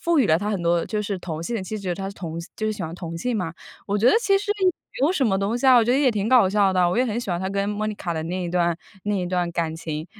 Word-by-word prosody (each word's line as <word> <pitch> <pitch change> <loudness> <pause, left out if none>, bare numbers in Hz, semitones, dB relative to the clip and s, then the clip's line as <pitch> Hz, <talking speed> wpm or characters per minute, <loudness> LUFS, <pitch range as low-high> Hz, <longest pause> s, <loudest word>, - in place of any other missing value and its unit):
赋 335 -2 +2
予 245 - +3
了 160 -2 +4
他 205 +3 -3
很 195 -5 -2
多 170 0 +2
就 210 -1 -2
是 200 -2 -3
同 165 -2 -5
性 230 +7 -2
的 195 - -3
气 215 - -4
质， 185 -3 -3
他 195 0 -4
是 200 - -9
同 165 -3 -6 0.2
就 215 - -3
是 215 - 0
喜 210 - -6
欢 160 -1 -5
同 165 -2 -6
性 245 +4 -1
嘛， 175 -5 -2 0.3
我 205 +1 0
觉 230 - +2
得 - - +6
其 395 -4 +3
实 410 +1 -1
也 375 - +3
没 285 -5 -2
有 350 - +2
什 275 -8 +1
么 195 -3 +1
东 200 +4 0
西 265 - 0
啊， 260 - +8
我 240 - +6
觉 240 - +1
得 270 - +3
也 270 -3 +4
挺 210 0 -1
搞 245 -7 +6
笑 200 -1 +3
的， 180 -1 +3
我 180 - -1
也 255 - +4
很 225 +1 -2
喜 205 - -5
欢 175 0 -1
他 190 - -2
跟 200 +1 -1
Monica 210 -4 -3
的 160 - -2
那 180 +2 -3
一 175 - -3
段 175 -1 +1 0.3
那 205 0 0
一 180 - -1
段 175 -1 -1
感 165 -1 -1
情， 160 0 -5
195 Hz, 390 characters per minute, -23 LUFS, 175-225 Hz, 0.3 s, 啊